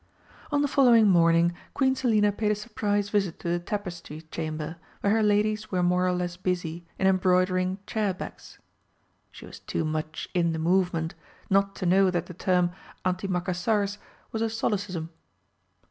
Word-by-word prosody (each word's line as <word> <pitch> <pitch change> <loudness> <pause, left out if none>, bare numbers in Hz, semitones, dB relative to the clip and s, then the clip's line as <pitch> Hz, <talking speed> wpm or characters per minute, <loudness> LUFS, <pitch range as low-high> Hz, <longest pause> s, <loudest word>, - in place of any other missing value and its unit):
On 290 0 +2
the - - +2
following 240 -6 +5
morning 170 -1 +4 0.2
Queen 265 -1 +3
Selina 215 -5 +3
paid 210 +1 0
a - - +2
surprise 205 -2 -1
visit 195 -5 0
to 170 - -4
the 175 0 +1
Tapestry 175 -5 -5
Chamber, 155 0 -4 0.2
where 200 - +2
her 225 - +3
ladies 215 0 +1
were 180 -2 0
more 180 +1 +2
or - - +2
less 180 -1 -2
busy 175 -2 -3
in 190 - 0
embroidering 185 0 +2
"chair 215 -3 0
backs" 185 - -9 0.7
(she - - -12
was - - -11
too 160 - -3
much 155 0 -3
in 170 -2 +2
the - - -2
movement 170 -1 +1 0.4
not 195 0 +3
to 185 - -4
know 190 +2 +5
that 175 -2 -1
the 180 - -9
term 180 0 +1 0.3
"antimacassars" 185 +2 0 0.3
was 220 - -3
a 225 - +1
solecism). 200 -7 -2
185 Hz, 160 wpm, -27 LUFS, 175-205 Hz, 0.7 s, following